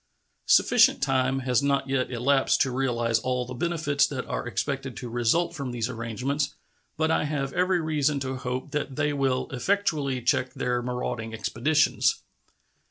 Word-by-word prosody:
Sufficient - - +5
time 135 0 +1
has 125 -1 +1
not 140 -1 +1
yet 135 -1 0
elapsed 130 +3 +2
to 130 - +2
realize 120 -3 0
all 125 -1 -1
the 125 - -7
benefits 145 -1 +1
that 130 -3 -4
are - - -4
expected - - -3
to 125 - -6
result 120 +10 +1
from 140 -6 -5
these 120 -2 -2
arrangements, 125 +5 -2 0.4
but 160 +1 +1
I 150 - +1
have 140 -2 -2
every 180 +1 +2
reason 150 -2 0
to 130 0 -3
hope 130 +3 -4
that 150 -2 -3
they 150 0 0
will 135 -2 0
effectually 145 -3 0
check 130 +1 +1
their 125 -1 -1
marauding 120 -2 -4
expeditions. 145 +8 +1
135 Hz, 160 wpm, -26 LUFS, 125-145 Hz, 0.4 s, Sufficient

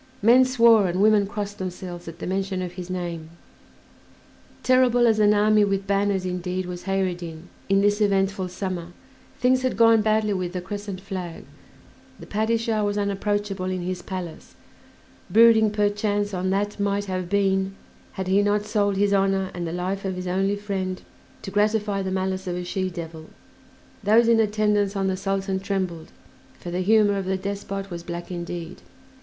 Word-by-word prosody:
Men 245 +4 +7
swore 230 -5 +5
and 180 +1 -2
women 210 -1 +4
crossed 205 -1 -5
themselves 180 -2 -6
at 165 0 -8
the - - -6
mention 190 0 -2
of 180 - -5
his 180 0 -8
name. 170 -3 -4 1.3
"Terrible 255 -1 +4
as 220 -2 +3
an 210 -1 +5
army 210 0 +4
with 195 -1 0
banners," 200 -1 +1
indeed, 180 0 -3
was 180 0 -7
Kheyr 195 0 +1
ed 175 - -6
Din 165 -1 -9 0.2
in 195 0 +4
this 205 +1 +2
eventful 195 -2 +1
summer: 180 -2 -5 0.5
things 255 +1 +3
had 255 0 -1
gone 230 -1 +6
badly 215 -1 +1
with 180 -2 -3
the 180 - -2
crescent 200 0 -6
flag, 185 -3 -6 0.7
the - - -10
Padishah 220 0 0
was 205 0 -1
unapproachable 200 -1 -1
in 185 -1 -2
his 180 0 -3
palace, 180 -3 -7 0.7
brooding 225 -1 +6
perchance 205 0 0
on 185 0 -1
that 205 +2 -1
"might 200 0 0
have 185 -2 -3
been" 195 -1 +1 0.4
had 190 -2 -4
he 195 +2 +4
not 205 0 +1
sold 205 -3 0
his 200 0 +2
honor 195 -1 +1
and 175 -1 -4
the - - -4
life 185 +3 -3
of 190 -1 -2
his 180 0 -5
only 195 +2 0
friend 195 -3 -4 0.4
to 195 - -6
gratify 210 -1 +1
the 190 - -3
malice 190 0 -2
of 175 - -2
a 180 - -4
she 185 +1 -2
devil; 165 -2 -8 0.7
those 225 +3 +5
in 230 -1 +5
attendance 210 -2 +1
on 195 -1 0
the 190 -1 0
Sultan 195 0 -2
trembled, 185 -4 -3 0.5
for 175 - -7
the 180 +1 -1
humor 205 +1 +4
of 190 - -4
the 190 0 0
despot 195 0 -5
was 170 -1 -5
black 170 +1 -7
indeed. 175 0 -6
195 Hz, 175 wpm, -24 LUFS, 185-205 Hz, 1.3 s, Men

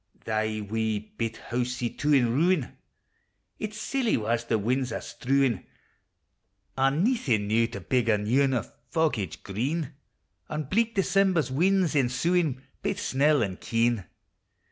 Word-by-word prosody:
Thy 110 -1 -1
wee 110 -1 -2
bit 115 -1 -2
housie, 125 0 -2
too, 145 +1 -1
in 120 -5 +4
ruin! 165 0 +1 0.8
Its 215 0 -4
silly 245 +1 0
wa's 115 +1 0
the 115 -1 +1
win's 125 +4 0
are - - -2
strewin'! 135 -2 0 1.1
An' 135 +5 +2
naething 135 - +1
now 115 +2 +3
to 120 - -7
big 125 -3 +1
a 105 - +4
new 110 +7 +2
ane 135 -2 +2
O' 120 - 0 0.3
foggage 135 - -1
green! 135 - -2 0.6
An' 155 0 -2
bleak 225 - 0
December's 190 -7 +2
winds 180 +4 +2
ensuin', 140 +2 +1 0.2
Baith - - -2
snell 145 0 +2
and 95 -3 -4
keen 115 -3 +1
130 Hz, 140 wpm, -27 LUFS, 115-160 Hz, 1.1 s, in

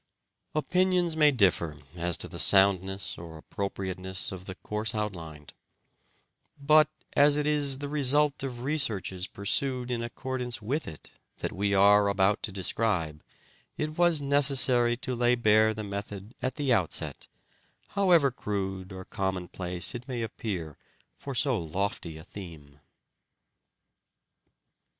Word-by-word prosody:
Opinions 180 +1 +1
may 150 -1 +5
differ 90 - +1 0.2
as 85 -1 -1
to - - -3
the - - -9
soundness 95 0 +2
or 85 -1 -9
appropriateness 95 +1 -5
of 95 -1 -8
the 95 - -6
course 105 +2 -3
outlined; 80 -9 -5 1.1
but, 155 +2 +5 0.2
as 145 0 +5
it 150 - 0
is 145 -3 +2
the 145 +1 -5
result 145 0 +3
of 125 -3 -5
researches 105 -10 0
pursued 125 +5 -1
in 120 -1 -1
accordance 125 +1 -4
with 130 +9 -3
it 75 - -10 0.3
that - - -3
we 100 +1 0
are 100 +1 +5
about 100 +1 +2
to - - -2
describe, 90 -5 -1 0.6
it 155 0 -3
was 175 -2 +3
necessary 135 -4 +4
to 130 +1 -3
lay 120 0 +2
bare 110 -2 +4
the 110 0 -5
method 100 +1 -7
at 130 +1 -2
the 140 -4 +1
outset, 95 -8 -2 0.6
however 175 -8 +3
crude 95 -4 -4
or 95 -1 -8
commonplace 90 -2 -1
it 120 +1 -8
may 120 -3 -3
appear 90 -9 -5 0.4
for 140 -2 -7
so 125 -1 +2
lofty 85 -1 -3
a 80 - -11
theme. 80 -8 -11
105 Hz, 130 wpm, -28 LUFS, 95-135 Hz, 1.1 s, may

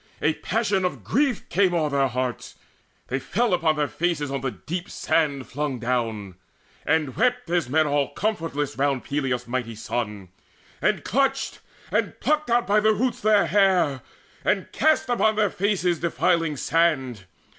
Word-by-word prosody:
A 155 - +2
passion 205 +1 0
of 180 - -2
grief 270 -3 0
Came 185 -1 +2
o'er 155 -3 +1
their 140 -1 +2
hearts; 125 -2 -4 0.5
they 135 - -1
fell 205 - 0
upon 165 -3 +2
their 150 -1 0
faces 155 -4 -1
On 140 - -2
the 135 - -1
deep 175 - -6
sand 145 -9 0
flung 145 -1 -3
down, 115 -6 -2 0.5
and 155 -5 +1
wept 250 -2 +1
as 170 -7 +1
men 155 +3 +3
All 145 -1 +1
comfortless 165 - -2
round 140 -2 +1
Peleus' 135 -4 -2
mighty 120 -2 -3
son, 105 -4 -4 0.5
And - - +1
clutched 270 +5 0 0.3
and - - -1
plucked 305 -2 0
out 240 0 +3
by 205 +1 +3
the 215 +1 +4
roots 250 +4 -1
their 210 -1 +4
hair, 185 -9 +2 0.4
And - - +1
east 315 0 +3
upon 220 -3 +2
their 210 -3 +2
heads 185 -4 0
defiling 165 -1 +1
sand. 135 - +1
160 Hz, 155 wpm, -24 LUFS, 135-200 Hz, 0.5 s, the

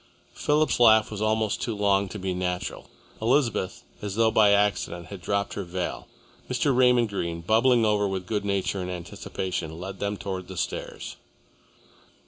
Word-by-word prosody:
Philip's 150 -1 +1
laugh 110 -2 +6
was 105 -1 -5
almost 110 -1 +1
too 115 - -2
long 100 -1 +2
to 105 - -6
be 95 -2 -2
natural. 90 0 -3 0.3
Elizabeth, 115 -5 +1 0.2
as 100 -1 -4
though 115 0 +3
by 110 -2 +5
accident, 100 -4 +1
had 100 -3 -8
dropped 100 +3 -1
her 100 - -3
veil. 90 0 -4 0.4
Mr. 125 +2 +1
Raymond 125 -2 +4
Greene, 85 -4 -3
bubbling 115 +5 +4
over 105 -1 +2
with 95 -2 -3
good 105 +2 -2
nature 100 -1 -1
and 90 - -4
anticipation, 90 -1 -5
led 95 +1 -7
them 100 0 -2
towards 95 -2 -5
the 95 - -8
stairs. - - -4
100 Hz, 160 wpm, -26 LUFS, 90-110 Hz, 0.4 s, laugh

